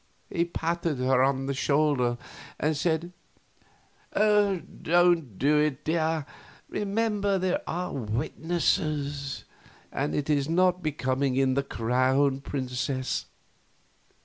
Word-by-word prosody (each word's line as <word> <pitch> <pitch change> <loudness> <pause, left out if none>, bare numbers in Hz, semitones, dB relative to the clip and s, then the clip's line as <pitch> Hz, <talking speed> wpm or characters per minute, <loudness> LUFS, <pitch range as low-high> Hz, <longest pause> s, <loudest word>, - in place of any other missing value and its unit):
He 170 -1 +1
patted 170 -2 -2
her 130 0 +3
on 135 0 +2
the 140 - -1
shoulder 135 -3 +2 0.4
and 155 +1 +1
said: 165 +3 -1 1.0
"Don't 175 - +2
do 150 +2 +3
it, 150 -1 0
dear; 160 -2 0 0.4
remember, 205 -1 0
there 185 -1 0
are 180 +2 -3
witnesses, 140 - -1 0.5
and 145 +2 -1
it 145 - -1
is 145 -1 +1
not 180 +1 +3
becoming 135 -3 0
in 135 -1 +3
the 140 - +2
Crown 130 +3 +1
Princess. 130 -1 -2
150 Hz, 105 wpm, -27 LUFS, 135-175 Hz, 1.0 s, her